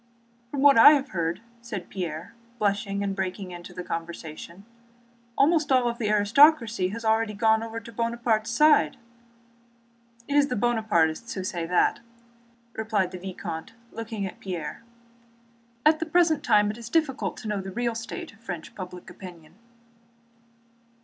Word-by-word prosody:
"From 275 +1 -2
what 280 -5 +7
I 290 - +10
have 280 -2 0
heard," 170 +2 -2 0.2
said 215 -6 -6
Pierre, 170 -3 -5 0.2
blushing 200 -1 -1
and 195 -1 -2
breaking 190 0 -4
into 175 0 -9
the 180 0 -7
conversation, 170 +2 -7 0.7
"almost 300 0 +3
all 245 -2 +3
the 235 -3 -3
aristocracy 225 0 +4
has 225 +4 -6
already 220 -1 +1
gone 220 +1 +3
over 230 0 -5
to 230 +1 -12
Bonaparte's 230 -1 0
side." 230 - +4 1.3
"It 285 - -3
is 290 -1 +5
the 250 - -2
Buonapartists 215 -4 +1
who 190 - -3
say 175 -3 -3
that," 180 +1 +2 0.7
replied 215 -4 -1
the 185 - -7
vicomte 175 -1 -6 0.2
without - - -20
looking 225 -2 -4
at 190 - -8
Pierre. 180 -5 -5 1.0
"At 310 0 +5
the 325 - -3
present 320 -2 +3
time 210 -3 +4
it 215 - -10
is 235 -1 -8
difficult 270 - 0
to - - -8
know 210 -2 -1
the 190 - -7
real 235 +3 -1
state 230 +9 -7
of 225 - -21
French 175 -8 -7
public 180 -2 -9
opinion." 175 -3 -12
215 Hz, 155 wpm, -26 LUFS, 185-235 Hz, 1.3 s, I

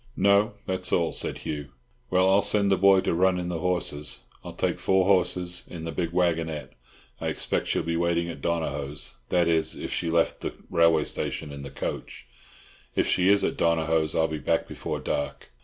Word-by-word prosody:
"No, 100 +3 +4
that's 95 -1 -1
all," 85 -2 +2
said - - -2
Hugh. 75 -2 -5 0.4
"Well, 95 0 +3
I'll 95 +1 +5
send 100 -1 +4
the - - +5
boy 95 0 +5
to - - 0
run 90 +2 +3
in 90 -1 -3
the 85 -2 -2
horses. 85 -5 -2 0.2
I'll - - -7
take - - -1
four 95 -1 +3
horses 90 -2 +1
in 85 -2 -7
the 80 - -4
big 85 -1 -2
waggonette; 80 -6 0 0.5
I - - -3
expect - - -1
she'll - - 0
be 85 0 -1
waiting 85 0 +1
at 80 -5 -7
Donohoe's—that 80 +2 -2
is, 80 -1 +1
if - - -5
she 85 - -1
left 85 0 +1
the - - -3 0.2
railway 85 -2 +4
station 75 - -3
in 70 0 -8
the 70 - -7
coach—if 70 - -6
she 90 +1 +3
is 100 0 +5
at - - -1
Donohoe's 80 -2 +1
I'll 80 - +3
be 80 -1 -4
back 80 +3 0
before - - -4
dark." 70 - -4
85 Hz, 190 wpm, -26 LUFS, 80-90 Hz, 0.5 s, I'll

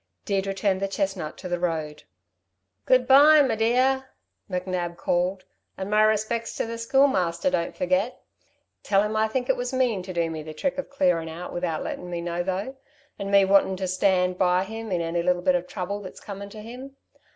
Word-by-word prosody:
Deirdre 195 -1 0
turned 195 -1 0
the 195 - 0
chestnut 190 -5 -3
to 185 - -7
the 175 -1 -2
road. 155 -4 -3 0.8
"Good 255 -1 +4
bye, 290 +3 +8
me 245 -5 +1
dear," 255 +4 +2 0.4
McNab 180 -2 -3
called. 180 +2 -1 0.3
"And 190 +1 -5
my 210 0 +4
respects 215 +2 +1
to - - -1
the 230 0 -6
Schoolmaster, 230 -4 +2
don't 170 -10 -1
forget! 185 +6 0 0.6
Tell 195 0 +2
him 210 +1 -2
I 220 0 +2
think 245 +3 -2
it - - +3
was 245 0 -3
mean 250 -7 +1
to 185 +1 -7
do 170 -2 -1
me 160 -1 -5
the 155 0 -9
trick 275 - -2
of - - -5
clearin' 180 -11 +1
out 170 +3 -7
without 175 -3 -2
lettin' 180 - -5
me 175 -1 -3
know 170 0 -2
though, 195 +9 -3 0.4
'n 200 - -4
me 200 -1 +5
wantin' 190 -1 +3
to 190 0 -2
stand 185 -1 +1
by 180 0 +3
him 225 +1 -7
in 175 -2 0
any 170 +1 -1
little 180 0 +1
bit 185 0 +4
of 180 0 -1
trouble 195 +2 -4
that's 185 -3 -10
comin' 200 0 -8
to 215 +1 -10
him. 255 +4 -9
195 Hz, 200 wpm, -25 LUFS, 180-225 Hz, 0.8 s, bye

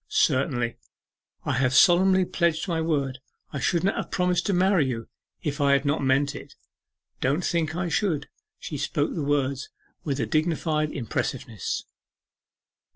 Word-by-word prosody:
'Certainly, 125 -4 +1 0.7
I - - 0
have 130 0 +2
solemnly 185 +4 +6
pledged 170 0 0
my 165 -3 0
word; 140 -5 -1 0.3
I 140 - -2
should 170 +6 +1
not 195 - +1
have - - -3
promised 180 -1 +1
to - - +2
marry 185 -4 +3
you 115 -3 -4 0.4
if 145 -2 -2
I 140 0 +4
had 140 +1 +2
not 145 +1 +1
meant 135 +2 +2
it. 140 -1 -10 0.6
Don't 145 +7 0
think 160 -3 0
I 180 0 -1
should.' 165 -5 0 0.3
She 150 - -6
spoke 145 +1 -1
the 165 - -3
words 140 -1 0 0.3
with 140 -3 -2
a - - +1
dignified 155 -1 0
impressiveness. 115 - -3
150 Hz, 155 wpm, -26 LUFS, 135-170 Hz, 0.7 s, solemnly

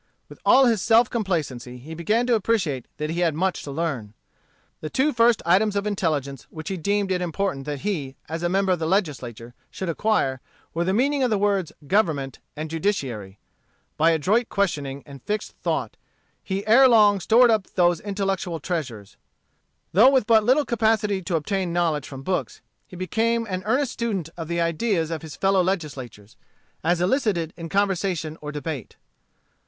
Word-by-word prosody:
With - - -13
all 270 - +6
his 225 -5 +2
self 230 +3 +4
complacency 150 - -2
he 145 +6 -10
began 210 +9 +1
to 245 - +2
appreciate 190 - 0
that 150 +1 -3
he 170 - -2
had 170 -4 +1
much 185 +3 0
to - - -8
learn. 135 -9 -3 0.6
The 155 - -5
two 285 - +1
first 230 -1 +3
items 200 +4 +3
of 200 0 -1
intelligence 150 - -2
which 155 -1 -7
he 190 - -3
deemed 200 +3 0
it 180 -1 0
important 175 -5 -2
that 145 -2 -4
he, 155 -10 -3
as 165 +1 -4
a 175 - 0
member 190 +1 +1
of 180 - +1
the 160 - -1
Legislature, 130 - -2 0.2
should 190 - -5
acquire, 160 -8 0 0.3
were 170 - 0
the 185 - 0
meaning 275 +7 +1
of 255 - +2
the 215 - +2
words 200 -4 0
government 150 - 0 0.2
and 155 +1 -4
judiciary. 130 - -2 0.6
By 160 +2 +4
adroit 190 +9 +2
questioning 145 -9 -2
and 140 -3 -12
fixed 210 - -3
thought, - - -2 0.5
he 195 +1 -3
ere 250 +5 +7
long 210 -4 +5
stored 230 +6 +5
up 215 -4 +1
those 175 -2 +3
intellectual 195 -3 -2
treasures. 130 - -5 0.8
Though 220 +9 +7
with 265 -5 +3
but 220 -1 +5
little 265 +6 +3
capacity 220 -4 +1
to 175 -1 -2
obtain 185 +3 -1
knowledge 165 -4 0
from 135 -1 -9
books, 185 +5 -2 0.3
he - - -12
became 225 +6 0
an 185 -4 -3
earnest 255 +3 +1
student 205 -9 -3
of 165 -2 -6
the 170 +1 -2
ideas 170 0 0
of 160 - -3
his 155 -3 -9
fellow 195 -1 +2
legislators 135 - -4 0.5
as 175 +2 +1
elicited 185 - 0
in 165 -1 -7
conversation 185 -5 -1
or 150 0 -5
debate. 145 -4 -5
180 Hz, 175 wpm, -24 LUFS, 155-210 Hz, 0.8 s, ere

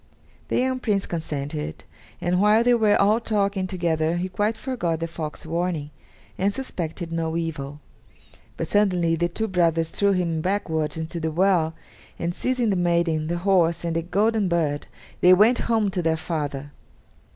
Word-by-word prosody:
The - - 0
young 260 0 +1
Prince 205 -5 0
consented, 150 -2 -4 0.4
and 180 +1 +1
while 210 +2 +5
they 245 0 +4
were 220 -3 +3
all 210 +3 +4
talking 200 -4 0
together 170 -3 0
he 185 +2 -2
quite 210 +4 0
forgot 200 - -2
the 165 - -2
fox's 160 -2 -6
warning, 165 -2 -2 0.5
and 195 +2 +2
suspected 175 -8 -5
no 165 0 -1
evil. 150 -3 -4 0.8
But - - -2
suddenly 180 -5 +2
the 175 +1 0
two 220 +6 -2
brothers 165 -4 +1
threw 200 -1 +2
him 170 -3 0
backwards 160 -5 -1
into 160 +2 -4
the 160 0 -1
well, 165 -1 +2 0.4
and, 170 0 -2
seizing 250 +1 0
the - - +1
maiden, 170 -3 +1
the 175 +1 -1
horse, 170 -4 +3
and 165 -1 -1
the 165 - +1
golden 205 +4 +1
bird, 160 -4 0 0.3
they 180 +1 +7
went 220 +6 +5
home 220 -4 +2
to 185 - -1
their 160 -1 +1
father. 145 -4 -4
175 Hz, 165 wpm, -24 LUFS, 160-200 Hz, 0.8 s, they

